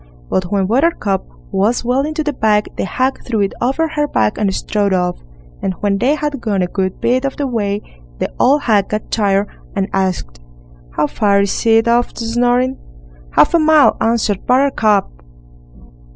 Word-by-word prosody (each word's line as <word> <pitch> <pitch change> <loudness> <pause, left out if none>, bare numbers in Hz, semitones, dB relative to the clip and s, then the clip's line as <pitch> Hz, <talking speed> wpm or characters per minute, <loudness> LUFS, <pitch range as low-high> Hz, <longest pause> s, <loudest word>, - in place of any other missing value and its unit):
But 185 - +1
when 200 -2 +1
Buttercup 220 - 0 0.2
was 210 +6 0
well 250 +3 +2
into 310 0 -2
the 295 -1 -2
bag, 210 -4 0
the - - -2
hag 255 +7 -1
threw 225 -4 -1
it 195 - 0
over 270 +7 +1
her 295 -1 -1
back 105 - 0
and 205 -2 +1
strode 200 +1 -1
off, 180 -1 0 0.4
and 190 - -1
when 200 -1 0
they 265 +7 +2
had 295 -3 -3
gone 200 -5 0
a - - -1
good 185 0 -3
bit 255 +2 +1
of 275 -1 -3
the 285 - -1
way, 210 -5 -2 0.3
the - - -3
old 285 +4 +3
hag 205 -4 +2
got 215 0 -4
tired, 200 -2 +1 0.3
and 195 -1 0
asked: 185 - -2 0.6
"How - - +3
far 200 +5 +2
is 200 +3 -1
it 225 0 +4
off 240 +1 +2
to 230 - -5
Snoring?" 245 +3 +1 0.5
"Half - - +4
a 340 - +5
mile", 310 -2 +5
answered 225 -4 0
Buttercup. 250 -6 +2
220 Hz, 180 wpm, -17 LUFS, 195-255 Hz, 0.6 s, a